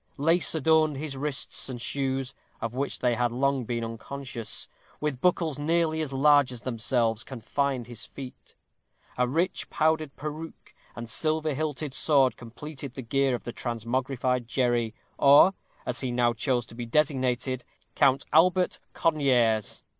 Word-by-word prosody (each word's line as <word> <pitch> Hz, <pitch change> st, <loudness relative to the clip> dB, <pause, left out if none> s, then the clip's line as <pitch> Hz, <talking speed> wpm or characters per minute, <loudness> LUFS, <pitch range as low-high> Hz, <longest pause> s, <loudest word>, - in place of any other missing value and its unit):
Lace 165 Hz, +4 st, +4 dB
adorned 155 Hz, -1 st, +3 dB
his 145 Hz, -1 st, -4 dB
wrists, 135 Hz, -1 st, -1 dB
and 125 Hz, -2 st, -5 dB
shoes 135 Hz, +1 st, -2 dB, 0.3 s
of 115 Hz, 0 st, -4 dB
which 135 Hz, +2 st, -2 dB
they 125 Hz, -1 st, +1 dB
had 120 Hz, +1 st, +1 dB
been 120 Hz, +1 st, -6 dB
long 125 Hz, -4 st, 0 dB
unconscious, 115 Hz, 0 st, -4 dB, 0.3 s
with 150 Hz, -4 st, -2 dB
buckles 165 Hz, -4 st, +1 dB
nearly 160 Hz, +1 st, +1 dB
as 150 Hz, -3 st, -3 dB
large 145 Hz, 0 st, +4 dB
as 120 Hz, -2 st, -6 dB
themselves, 115 Hz, -2 st, 0 dB
confined 130 Hz, +1 st, -2 dB
his 120 Hz, -1 st, -5 dB
feet. 130 Hz, -2 st, -11 dB, 0.6 s
A 125 Hz, 0 st, +1 dB
rich 165 Hz, +8 st, -1 dB
powdered 155 Hz, -2 st, +1 dB
peruke 155 Hz, +2 st, -8 dB, 0.2 s
and 120 Hz, 0 st, -6 dB
silver 155 Hz, +5 st, +1 dB
hilted 150 Hz, -1 st, -3 dB
sword 135 Hz, -4 st, +3 dB
completed 135 Hz, +3 st, -8 dB
the 130 Hz, -, -6 dB
gear 135 Hz, +2 st, +1 dB
of 120 Hz, -, -7 dB
the 120 Hz, -, -6 dB
transmogrified 125 Hz, +1 st, -2 dB
Jerry, 120 Hz, -3 st, 0 dB, 0.2 s
or, 145 Hz, +7 st, +7 dB, 0.3 s
as 125 Hz, -, -2 dB
he 130 Hz, -, -2 dB
now 120 Hz, -1 st, +2 dB
chose 120 Hz, 0 st, 0 dB
to -, -, -14 dB
be 120 Hz, 0 st, -6 dB
designated, 130 Hz, -2 st, 0 dB, 0.3 s
Count 135 Hz, -1 st, +3 dB
Albert 180 Hz, +3 st, +4 dB
Conyers. 125 Hz, -9 st, +1 dB
135 Hz, 145 wpm, -27 LUFS, 120-150 Hz, 0.6 s, or